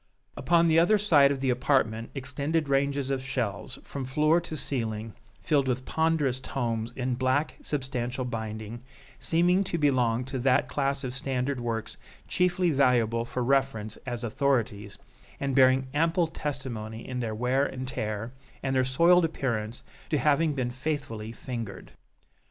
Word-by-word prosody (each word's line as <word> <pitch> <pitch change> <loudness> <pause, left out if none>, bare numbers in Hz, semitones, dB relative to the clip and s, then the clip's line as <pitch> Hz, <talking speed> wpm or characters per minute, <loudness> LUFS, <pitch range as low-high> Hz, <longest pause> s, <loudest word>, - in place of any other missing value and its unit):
Upon 170 0 +3
the 160 0 +5
other 210 +6 +5
side 155 -9 +5
of 135 -2 -2
the 130 -2 +2
apartment 120 -3 +1
extend 140 +4 -2
ranges 140 0 +1
of 130 -1 -1
shelves, 120 -7 -3
from 140 - -6
floor 155 +6 +2
to 160 -2 -6
ceiling, 115 -6 -3 0.3
filled 140 -4 +2
with 130 0 -1
ponderous 160 -5 +1
tomes 115 -3 -3
in 130 -1 -1
black 130 +4 0
substantial 130 -3 -3
binding, 110 -1 -5 0.4
seeming 175 +3 +3
to 180 -2 -2
belong 125 -5 +2
to 135 0 -4
that 130 +1 +3
class 140 0 -1
of 125 -1 -3
standard 130 0 0
works 115 -2 -3 0.3
chiefly 180 -1 +2
valuable 120 -5 +2
for 125 +1 -3
reference 125 -5 0
as 120 -2 -6
authorities, 110 -4 -1 0.4
and 140 -2 -1
bearing 130 0 +5
ample 165 +3 +2
testimony 130 -8 -5
in 125 -1 -4
their 110 -3 -2
wear 125 +4 +1
and 130 -2 -4
tear, 110 0 -4 0.3
and 135 -1 0
their 130 - +4
soiled 170 +7 +4
appearance, 120 -8 -2 0.3
to 155 - +2
having 150 +3 +2
been 125 -3 -1
faithfully 130 -5 -4
fingered. 115 -5 -7
130 Hz, 150 wpm, -28 LUFS, 120-145 Hz, 0.4 s, the